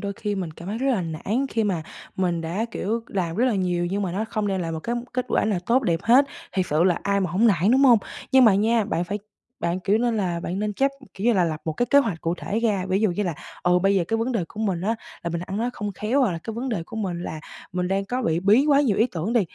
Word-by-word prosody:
đôi 200 Hz, -1 st, -3 dB
khi 205 Hz, +1 st, -3 dB
mình 185 Hz, -4 st, -3 dB
cảm 170 Hz, +4 st, -10 dB
thấy 220 Hz, +3 st, -3 dB
rất 270 Hz, -, -1 dB
là 230 Hz, -, +1 dB
nản 190 Hz, -, -2 dB
khi 225 Hz, -1 st, 0 dB
mà 180 Hz, -6 st, -1 dB, 0.3 s
mình 175 Hz, -3 st, 0 dB
đã, 170 Hz, +7 st, -2 dB
kiểu, 225 Hz, +4 st, -2 dB
làm 175 Hz, -3 st, -2 dB
rất 245 Hz, -, +3 dB
là 245 Hz, -4 st, +2 dB
nhiều 175 Hz, -2 st, 0 dB
nhưng 200 Hz, +1 st, -1 dB
mà 180 Hz, -3 st, -2 dB
nó 210 Hz, +4 st, -1 dB
không 215 Hz, -1 st, -2 dB
đem 190 Hz, -2 st, -1 dB
lại 165 Hz, -1 st, -3 dB
một 160 Hz, -, -4 dB
cám 240 Hz, +3 st, -3 dB
kết 255 Hz, 0 st, -1 dB
quả -, -, +2 dB
nào 210 Hz, -4 st, +1 dB
tốt 255 Hz, +3 st, +3 dB
đẹp 170 Hz, -6 st, +1 dB
hết, 250 Hz, +5 st, +6 dB, 0.3 s
thiệt 185 Hz, -2 st, 0 dB
sự 155 Hz, +3 st, +3 dB
là 180 Hz, -3 st, +3 dB
ai 200 Hz, 0 st, +1 dB
mà 180 Hz, -4 st, -1 dB
hổng 210 Hz, +6 st, +3 dB
nản, 195 Hz, 0 st, +3 dB
đúng 270 Hz, +2 st, +5 dB
hông? 240 Hz, -4 st, +7 dB, 0.3 s
Nhưng 260 Hz, -1 st, +7 dB
mà 210 Hz, -4 st, +6 dB
nha, 220 Hz, +2 st, +2 dB
bạn 175 Hz, -4 st, -1 dB
phải 205 Hz, +3 st, -3 dB, 0.4 s
bạn, 175 Hz, +2 st, -1 dB
kiểu, 205 Hz, +4 st, +2 dB
nên 235 Hz, -1 st, +1 dB
là 175 Hz, -4 st, -1 dB
bạn 180 Hz, +3 st, -3 dB
nên 210 Hz, 0 st, -1 dB
chấp 275 Hz, +4 st, +2 dB, 0.2 s
kiểu 195 Hz, -, -6 dB
như 240 Hz, -, +5 dB
là, 185 Hz, -4 st, +3 dB
lập 155 Hz, -2 st, -2 dB
một 160 Hz, -, -1 dB
cái 245 Hz, +9 st, 0 dB
kế 280 Hz, -, +5 dB
hoạch 200 Hz, -12 st, 0 dB
cụ 165 Hz, +1 st, -1 dB
thể 215 Hz, -, -2 dB
ra. 210 Hz, -5 st, +1 dB
Ví 190 Hz, +1 st, +1 dB
dụ 215 Hz, -4 st, +3 dB
như 205 Hz, +4 st, -1 dB
là, 175 Hz, -5 st, -2 dB, 0.3 s
ừ, 180 Hz, 0 st, +4 dB
bây 195 Hz, +2 st, +2 dB
giờ 180 Hz, -3 st, +2 dB
cái 225 Hz, -, +1 dB
vấn 235 Hz, +3 st, -1 dB
đề 195 Hz, -7 st, 0 dB
của 215 Hz, -, -8 dB
mình 190 Hz, -6 st, 0 dB
á 220 Hz, +5 st, 0 dB, 0.3 s
là 170 Hz, -, -3 dB
mình 170 Hz, 0 st, -2 dB
ăn 190 Hz, +3 st, -5 dB
nói 240 Hz, +3 st, 0 dB
không 205 Hz, 0 st, -4 dB
khéo 235 Hz, +9 st, 0 dB
hoặc 225 Hz, -9 st, +2 dB
là 165 Hz, -, -4 dB
cái 225 Hz, -, -5 dB
vấn 255 Hz, +3 st, -3 dB
đề 200 Hz, -8 st, -2 dB
của 225 Hz, +6 st, -10 dB
mình 180 Hz, -5 st, -3 dB
là 155 Hz, -3 st, -5 dB, 0.3 s
mình 180 Hz, 0 st, -1 dB
đang 195 Hz, +1 st, 0 dB
có 250 Hz, +5 st, -2 dB
bị 165 Hz, -2 st, +1 dB
bí 210 Hz, +8 st, +5 dB
quá 285 Hz, -1 st, +5 dB
nhiều 230 Hz, -9 st, +2 dB
ý 225 Hz, -, +4 dB
tưởng 185 Hz, +1 st, -3 dB
đi, 235 Hz, -, +4 dB
200 Hz, 305 wpm, -24 LUFS, 175-230 Hz, 0.4 s, hông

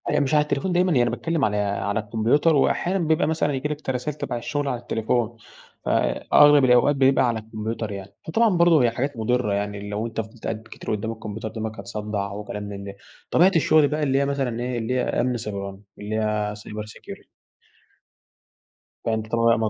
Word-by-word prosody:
أنا 150 Hz, -, +2 dB
مش 140 Hz, 0 st, 0 dB
على 150 Hz, -, +6 dB
التليفون 150 Hz, +5 st, -1 dB
دايمًا. 180 Hz, +1 st, +2 dB
يعني 120 Hz, -5 st, +3 dB
باتكلّم 165 Hz, -5 st, 0 dB
على 105 Hz, 0 st, 0 dB
على 100 Hz, 0 st, -1 dB
الكمبيوتر 115 Hz, +9 st, +2 dB
وأحيانًا 180 Hz, +6 st, +1 dB
بيبقى 160 Hz, -3 st, +2 dB
مثلًا 155 Hz, -2 st, 0 dB
ييجي 135 Hz, +2 st, -2 dB
لك 150 Hz, 0 st, -4 dB
ت -, -, -6 dB
رسايل 130 Hz, +3 st, -2 dB
تَبَع 120 Hz, -, -3 dB
الشغل 145 Hz, +4 st, -2 dB
على 125 Hz, -3 st, -1 dB
التليفون، 120 Hz, 0 st, -1 dB, 0.5 s
فأغلب 145 Hz, -2 st, +4 dB
الأوقات 125 Hz, +3 st, +5 dB
بيبقى 135 Hz, -1 st, +4 dB
على 115 Hz, -2 st, 0 dB
الكمبيوتر 110 Hz, 0 st, -5 dB
يعني. 100 Hz, 0 st, -8 dB
فطبعًا 215 Hz, +2 st, +3 dB
برضه 170 Hz, -5 st, +5 dB
هي 120 Hz, -, +3 dB
حاجات 130 Hz, +3 st, -3 dB
مُضرّة. 115 Hz, -1 st, 0 dB
يعني 100 Hz, 0 st, -3 dB
لو 105 Hz, +2 st, -2 dB
أنت 115 Hz, 0 st, -3 dB
فضلت 110 Hz, +1 st, -14 dB
قاعد 110 Hz, 0 st, -3 dB
كتير -, -, -6 dB
قُدّام 110 Hz, +2 st, -3 dB
الكمبيوتر 110 Hz, -1 st, -6 dB
دماغك 110 Hz, -1 st, -5 dB
هتصدّع 100 Hz, 0 st, -4 dB
و 105 Hz, +1 st, -6 dB
كلام 105 Hz, 0 st, -6 dB
من 100 Hz, -1 st, -7 dB
ده. 100 Hz, 0 st, -8 dB, 0.4 s
طبيعة 180 Hz, +3 st, +5 dB
الشغل 155 Hz, -2 st, +5 dB
بقى 150 Hz, +2 st, -1 dB
اللي 135 Hz, -1 st, +2 dB
هي 140 Hz, -, +2 dB
مثلًا 135 Hz, -4 st, -1 dB
إيه، 125 Hz, 0 st, -2 dB
اللي 115 Hz, +2 st, -2 dB
هي 130 Hz, -, +1 dB
أمن 125 Hz, 0 st, 0 dB
سيبراني. 100 Hz, -3 st, -6 dB, 0.2 s
اللي 105 Hz, +1 st, -4 dB
هي 105 Hz, -1 st, 0 dB
cyber 105 Hz, 0 st, -7 dB
security. 105 Hz, -, -11 dB, 1.8 s
فأنت 110 Hz, -1 st, -1 dB
طبعًا 115 Hz, 0 st, +4 dB
115 Hz, 190 wpm, -24 LUFS, 105-145 Hz, 1.8 s, على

